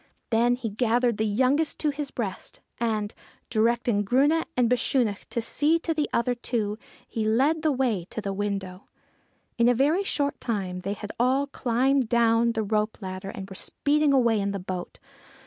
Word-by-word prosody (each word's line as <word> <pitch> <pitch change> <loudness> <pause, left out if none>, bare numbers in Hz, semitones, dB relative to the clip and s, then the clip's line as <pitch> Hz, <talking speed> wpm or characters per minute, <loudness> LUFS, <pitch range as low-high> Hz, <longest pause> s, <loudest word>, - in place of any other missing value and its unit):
Then 235 +2 +3
he 245 -2 -4
gathered 235 +1 +1
the 220 - +1
youngest 260 +9 +1
to 300 - +2
his 285 -1 -5
breast, 210 -8 -5 0.2
and, 220 -2 -1 0.4
directing 230 -1 +2
Grunne 280 +9 +3
and 245 -2 +4
Bechunach 240 -3 0
to 235 - -2
see 300 +8 +2
to 330 0 -2
the 300 -1 -1
other 245 +1 +1
two, 225 -3 -2 0.3
he 225 - -3
led 270 +9 +2
the 310 -1 +2
way 240 -10 0
to - - -5
the 200 -2 -3
window. 195 -2 -4 0.7
In 235 +1 +5
a 245 - +3
very 300 - +2
short 285 -6 -1
time 190 -6 -2
they 195 +2 -3
had 210 0 -7
all 260 +3 +3
climbed 260 -1 +1
down 235 0 +3
the 220 -1 -1
rope 215 +1 0
ladder 190 -1 -6
and 195 - -7
were 195 - -10
speeding 295 +7 +1
away 235 -5 +3
in 200 0 -1
the 200 - -3
boat. 180 -1 -6
235 Hz, 180 wpm, -26 LUFS, 205-265 Hz, 0.7 s, In